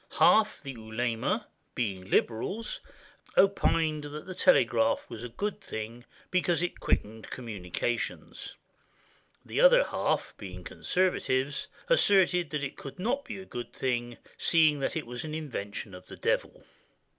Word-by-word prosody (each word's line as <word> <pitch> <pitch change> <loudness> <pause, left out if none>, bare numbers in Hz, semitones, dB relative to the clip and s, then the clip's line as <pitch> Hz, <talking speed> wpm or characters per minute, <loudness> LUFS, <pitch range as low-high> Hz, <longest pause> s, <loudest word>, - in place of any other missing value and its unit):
Half 215 -5 +5
the 135 - -5
ulema, 115 0 -1 0.3
being 95 -5 -2
liberals, 190 - 0 0.6
opined 165 -6 +3
that 150 +1 -7
the 185 - -6
telegraph 280 +5 +4
was 115 - -6
a 125 - -5
good 205 - -3
thing, 115 +3 -6 0.3
because 175 -2 +2
it 175 - -3
quickened 110 +1 -1
communications; 115 0 -3 0.9
the - - 0
other - - +8
half, - - -1
being - - -8
conservatives, 145 -7 0 0.2
asserted 190 - +4
that 150 0 -2
it 135 - -4
could 135 - -8
not 245 +9 -1
be 195 -5 -7
good, 120 -3 -3 0.2
seeing 155 -3 +4
that 135 - -1
it 160 - -2
was 120 +1 -5
an 155 -1 -4
invention 105 -10 -5
of 90 0 -11
the - - -10
Devil. - - -1
145 Hz, 135 wpm, -29 LUFS, 120-185 Hz, 0.9 s, other